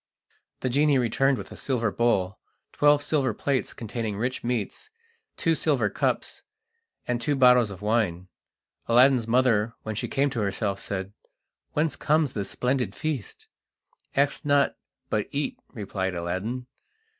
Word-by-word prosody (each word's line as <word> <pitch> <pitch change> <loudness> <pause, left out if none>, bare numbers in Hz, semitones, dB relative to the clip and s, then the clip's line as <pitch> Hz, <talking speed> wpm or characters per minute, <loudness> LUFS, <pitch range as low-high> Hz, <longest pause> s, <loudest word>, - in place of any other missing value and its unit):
The 130 - 0
genie 145 +2 +3
returned 130 +3 +2
with 100 -3 -8
a - - -8
silver 120 -6 -1
bowl, 100 -5 +1 0.3
twelve 145 0 +4
silver 135 -8 +1
plates 135 +1 -1
containing 110 -2 -4
rich 125 +4 -2
meats, 120 - -3 0.5
two - - +2
silver - - +1
cups, - - -1 0.7
and 120 -1 -1
two 145 +4 +1
bottles 125 -4 +6
of 100 0 -9
wine. 105 -5 0 0.6
Aladdin's 125 0 +5
mother, 115 -2 +2
when 110 - -3
she 105 - -3
came 140 0 +1
to 125 - -3
herself, 100 0 -1
said: 95 0 -4 0.6
"Whence 150 -1 +1
comes 155 -2 +1
this 100 -2 -3
splendid 125 0 -1
feast?" 150 -7 -4 0.7
"Ask 140 +1 +1
not, 145 -1 +3 0.4
but 105 -1 0
eat," 145 0 -2
replied 95 -5 -3
Aladdin. 95 +9 -3
120 Hz, 140 wpm, -26 LUFS, 105-135 Hz, 0.7 s, bottles